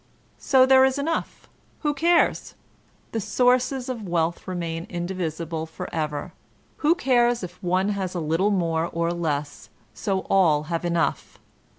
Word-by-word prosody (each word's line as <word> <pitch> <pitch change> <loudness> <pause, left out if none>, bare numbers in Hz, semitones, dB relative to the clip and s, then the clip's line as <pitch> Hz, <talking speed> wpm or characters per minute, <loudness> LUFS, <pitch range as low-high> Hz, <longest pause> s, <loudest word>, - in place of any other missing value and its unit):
So 260 -1 +5
there 265 0 +6
is 265 +1 +2
enough, 320 +4 -3 0.3
who 295 -2 +1
cares? 335 +4 +2 0.6
The 225 - -2
sources 250 +3 +1
of 235 -6 -5
wealth 170 +1 -1
remain 170 -2 -4
indivisible 170 -2 -4
forever; 155 -2 -4 0.4
who 315 +3 +3
cares 245 - +2
if 180 +1 -8
one 185 +2 +1
has 190 -3 -3
a - - -1
little 165 +5 +1
more 170 -4 0
or 170 +1 -1
less, 150 -4 -3 0.2
so 195 -2 -1
all 160 -6 +3
have 165 - -1
enough 170 -1 -1
185 Hz, 135 wpm, -24 LUFS, 165-245 Hz, 0.6 s, there